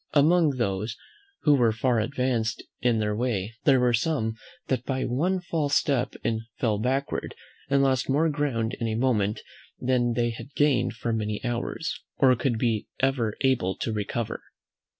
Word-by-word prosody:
Among 155 -1 +4
those 110 0 -1 0.5
who 150 - +5
were 120 -5 +4
far 120 +1 +1
advanced 120 -2 -1 0.2
in 120 -2 +3
their 105 -1 0
way 110 -3 -1
there 135 -3 +6
were 125 -1 +3
some 115 -3 0 0.3
that 130 -2 -1
by 130 0 -2
one 170 +10 0
false 155 -5 -1
step 135 -4 +1 0.4
fell 110 -4 +1
backward, 135 +5 -1 0.3
and 140 0 +3
lost 130 -1 +1
more 150 +5 +3
ground 130 -6 -1
in 115 - -1
a 110 - -1
moment, 110 -4 +1 0.4
than 125 -1 +1
they 120 0 +1
had 115 +5 -10
gained 130 -5 +2
for 115 0 -3
many 105 -1 -2
hours, 120 +7 -3 0.2
or 130 -3 +5
could 120 -1 0
be 110 -2 0
ever 130 -5 +1
able 130 -9 +2
to 115 - -3
recover. 105 +2 -3
125 Hz, 160 wpm, -26 LUFS, 115-135 Hz, 0.5 s, there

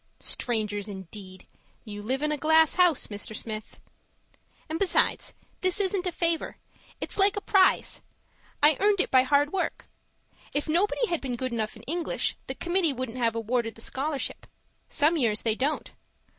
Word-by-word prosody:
Strangers 210 -4 0
indeed! 190 -1 -9 0.4
You 205 -2 -7
live 260 +7 -2
in 300 - +1
a - - +1
glass 315 +1 +4
house, 355 -5 +4
Mr. 205 +1 -4
Smith. 215 0 -6 0.9
And 320 +1 -3
besides, 395 - +2 0.3
this 370 +2 +2
isn't 380 -2 0
a - - 0
favour; 335 -1 -1 0.4
it's - - -5
like 395 +1 +5
a - - -1
prize 390 -2 +3 0.6
I 300 -1 +6
earned 405 0 +3
it - - +1
by 260 - +7
hard 285 +4 +2
work. 385 - -2 0.7
If 290 - 0
nobody 385 +9 +2
had 345 -7 -2
been 255 -3 -3
good 255 +1 -3
enough 220 -2 -2
in - - -13
English, 335 +3 -1
the - - -4
committee 345 -3 +1
wouldn't 255 -1 -5
have 230 -2 +1
awarded 230 0 -1
the 225 - -9
scholarship; 275 +4 -3 0.4
some 315 +3 +2
years 225 -7 +1
they 225 - +2
don't. 275 +7 -2
285 Hz, 165 wpm, -27 LUFS, 225-345 Hz, 0.9 s, by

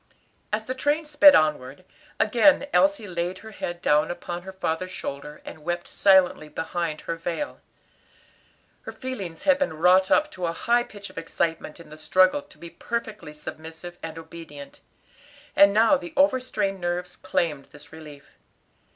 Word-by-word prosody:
As 215 +1 -1
the 255 - -3
train 290 +4 0
sped 295 -1 +7
onward, 150 +1 0 0.3
again 240 +6 +4
Elsie 290 -7 +3
laid 175 0 -3
her 220 - -9
head 175 -4 -6
down 150 +1 +3
upon 175 0 -5
her 190 +2 -9
father's 185 -1 -3
shoulder 150 -3 -7
and - - -9
wept 175 +1 -3
silently 190 -5 +3
behind 160 0 -3
her 165 - -4
veil. 170 - -5 1.2
Her - - -8
feelings 195 -11 -7
had 280 -1 +4
been 280 - -1
wrought 185 +3 +4
up 305 0 +3
to 180 - -3
a 165 - -2
high 240 +7 +2
pitch 205 -1 -10
of - - -6
excitement 165 -1 -3
in 165 - -14
the 155 - -11
struggle 185 - +3
to 285 - -20
be 170 -1 -11
perfectly 220 -8 -5
submissive 160 +3 -9
and 165 0 -7
obedient, 160 -3 -11 0.8
and 200 0 +7
now 225 +7 +4
the 315 +4 -9
overstrained 255 -9 +1
nerves 175 +1 -3
claimed 160 -7 -2
this 145 +1 -16
relief. 150 -3 -13
175 Hz, 160 wpm, -25 LUFS, 160-220 Hz, 1.2 s, sped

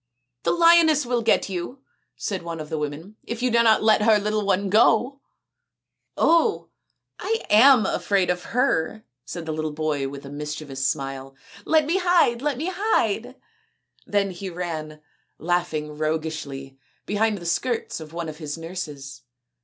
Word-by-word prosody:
" 125 -1 -56
The - - +3
lioness 335 -4 +5
will 240 -1 0
get 225 - +2
you," 195 +8 -6 0.3
said 195 -4 -4
one 170 -1 -6
of 155 -1 -7
the 155 - -3
women, 155 +8 -6
" - - -44
if 235 +1 -4
you 250 - +2
do 235 0 +4
not 220 -2 +4
let 215 -1 +4
her 215 0 +5
little 210 +1 -1
one 200 0 +1
go! 230 +6 +3 0.4
" - - -59
" - - -56
Oh, 335 +6 +2 0.5
I 450 +1 -2
am 240 +1 +7
afraid 190 -2 +1
of 180 0 -4
her," 220 -5 0 0.2
said 170 -2 -6
the 160 - -3 0.2
boy 150 -2 -2
with 140 +1 -9
a 140 - -9
mischievous 145 -2 -4
smile. 135 0 -4 0.2
" - - -17
Let 315 -1 +3
me 335 +5 +1
hide; 350 -10 +3
let 290 -2 -1
me 330 +7 -2
hide." 255 - 0 0.7
Then 200 -1 +1
he 185 +2 -6
ran, 160 -4 -5 0.4
laughing 160 -3 -2
roguishly, 155 -3 -4 0.3
behind 210 +1 0
the 170 - -10
skirts 225 +7 -1
of 155 -1 -10
one 170 0 -5
of 155 -1 -7
his 150 -1 -5
nurses. 150 -6 -7
185 Hz, 170 wpm, -24 LUFS, 155-235 Hz, 0.7 s, am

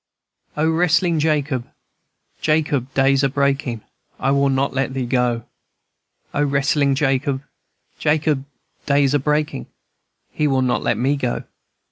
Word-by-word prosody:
"O 155 +1 +2
wrestlin' 165 0 +2
Jacob, 145 -5 0 0.7
Jacob, 150 -4 0
day's 135 +1 +3
a 135 - +3
breakin'; 135 -4 -1 0.4
I 135 - +1
will 140 0 +3
not 135 +1 0
let 135 -1 -1
thee 130 -2 -1
go! 120 -2 0 0.9
O 145 - +1
wrestlin' 140 0 +2
Jacob, 135 0 0 0.6
Jacob, 150 -2 +1 0.4
day's 140 -1 +3
a 145 - +3
breakin'; 150 - -1 0.6
He 150 - 0
will 135 -2 +2
not 125 - +1
let 115 - 0
me 135 +5 +1
go! 125 -4 -2
140 Hz, 130 wpm, -20 LUFS, 130-150 Hz, 0.9 s, day's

